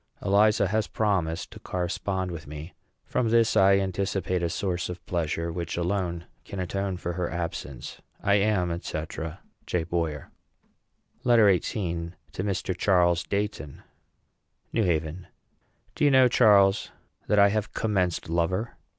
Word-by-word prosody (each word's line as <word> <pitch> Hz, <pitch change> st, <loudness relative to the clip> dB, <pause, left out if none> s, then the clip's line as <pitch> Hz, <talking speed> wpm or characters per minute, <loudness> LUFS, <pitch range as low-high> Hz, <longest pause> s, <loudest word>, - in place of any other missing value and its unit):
Eliza 100 Hz, 0 st, +4 dB
has 110 Hz, +1 st, 0 dB
promised 90 Hz, -7 st, -1 dB
to -, -, -11 dB
correspond 90 Hz, +1 st, -2 dB
with 80 Hz, -3 st, -7 dB
me. 75 Hz, +4 st, -8 dB, 0.3 s
From 125 Hz, -3 st, 0 dB
this 115 Hz, 0 st, +3 dB
I 95 Hz, 0 st, +6 dB
anticipate 95 Hz, -1 st, -1 dB
a 85 Hz, -, 0 dB
source 90 Hz, -1 st, -2 dB
of 90 Hz, 0 st, -7 dB
pleasure 85 Hz, -1 st, -2 dB
which 85 Hz, 0 st, -4 dB
alone 85 Hz, -1 st, -1 dB, 0.2 s
can 100 Hz, -, -7 dB
atone 95 Hz, +1 st, -2 dB
for 85 Hz, 0 st, -4 dB
her 90 Hz, 0 st, -2 dB
absence. 80 Hz, -6 st, -5 dB, 0.2 s
I 100 Hz, -, +2 dB
am, 90 Hz, -5 st, +1 dB
&c., 80 Hz, -, -4 dB, 0.6 s
J. 90 Hz, -2 st, 0 dB
BOYER. 80 Hz, -3 st, -3 dB, 0.9 s
LETTER 115 Hz, -6 st, +6 dB
XVIII. 85 Hz, -6 st, -3 dB, 0.2 s
TO 95 Hz, -, -4 dB
MR. 95 Hz, -2 st, -2 dB
CHARLES 85 Hz, -2 st, +3 dB
DEIGHTON. 100 Hz, -8 st, -3 dB, 0.9 s
NEW 115 Hz, -, +2 dB
HAVEN. 80 Hz, +1 st, -1 dB, 0.7 s
Do -, -, -2 dB
you 145 Hz, -, +6 dB
know, 130 Hz, -2 st, +6 dB
Charles, 100 Hz, -4 st, +4 dB, 0.4 s
that 105 Hz, -, +2 dB
I 100 Hz, 0 st, +7 dB
have 105 Hz, +1 st, -2 dB
commenced 95 Hz, -5 st, 0 dB
lover? 85 Hz, +7 st, -1 dB
90 Hz, 140 wpm, -27 LUFS, 85-100 Hz, 0.9 s, I